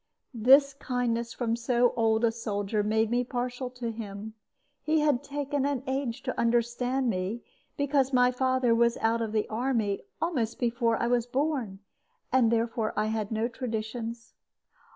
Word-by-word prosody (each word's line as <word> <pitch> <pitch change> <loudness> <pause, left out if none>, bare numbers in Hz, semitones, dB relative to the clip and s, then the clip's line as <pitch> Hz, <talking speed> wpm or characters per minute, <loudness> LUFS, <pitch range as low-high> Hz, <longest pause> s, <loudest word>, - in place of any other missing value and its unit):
This 270 +5 +5
kindness 240 -3 -2
from 230 -2 -1
so 240 +1 +2
old 225 -1 +2
a 230 - +3
soldier 210 -2 -2
made 220 +2 +1
me 245 +1 +2
partial 250 +1 -3
to 250 -2 -5
him. 215 -1 -7 0.5
He 310 0 +2
had 290 -3 +2
taken 285 -1 -2
an 280 -2 -1
age 265 -3 -2
to - - -3
understand 240 +2 +1
me, 200 +2 -2 0.3
because 280 -2 +1
my 250 -1 +4
father 255 -1 +2
was 235 0 +3
out 230 +1 +1
of 225 -2 -2
the 215 -1 0
army 225 -3 -1 0.2
almost 275 -9 -1
before 235 -1 +1
I - - 0
was 240 0 +1
born, 255 -7 -1 0.5
and 245 -3 +4
therefore 230 -1 0
I 210 - +2
had 215 -1 -3
no 220 +1 0
traditions. 230 -1 -5
235 Hz, 155 wpm, -28 LUFS, 225-255 Hz, 0.5 s, This